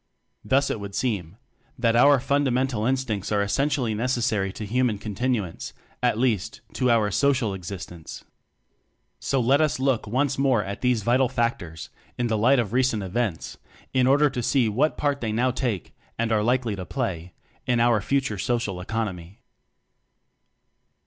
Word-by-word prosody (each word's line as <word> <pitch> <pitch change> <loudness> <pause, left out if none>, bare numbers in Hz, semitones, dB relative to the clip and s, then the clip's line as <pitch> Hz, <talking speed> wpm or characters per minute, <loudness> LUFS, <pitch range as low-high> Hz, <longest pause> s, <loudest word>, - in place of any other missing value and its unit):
Thus 140 +1 +2
it - - -3
would 100 -1 -7
seem 105 -7 -2 0.4
that 115 -2 +2
our 140 +3 +6
fundamental 130 -4 0
instincts 125 -7 -1
are 100 -1 +2
essentially 125 +2 0
necessary 110 -4 0
to 110 - -6
human 120 0 +1
continuance 105 -2 -3 0.3
at - - +2
least, 115 -6 -1
to 125 - +1
our 110 -3 +3
social 130 -3 +1
existence. 90 -3 -8 1.0
So 135 - 0
let 135 +5 +3
us 155 -1 +1
look 130 -5 0
once 130 +5 0
more 130 -6 +3
at 100 0 -6
these 125 -4 +1
vital 125 +3 +3
factors, 115 -10 -3 0.3
in 120 - 0
the 110 -2 0
light 130 +6 +4
of 115 -3 -1
recent 125 -5 +1
events, 95 -2 -3 0.3
in 130 -1 +3
order 145 +3 +5
to 130 -3 -3
see 125 0 +2
what 130 +9 +1
part 145 -1 0
they 110 -2 -2
now 125 +4 +1
take 120 -7 -3 0.2
and 115 0 -1
are 110 -1 +3
likely 120 -1 +1
to 95 -2 -6
play 90 -9 -4 0.3
in 120 -1 +2
our 115 -3 +3
future 130 -2 -1
social 115 -7 -1
economy. 95 -3 -5
120 Hz, 155 wpm, -25 LUFS, 105-130 Hz, 1.0 s, our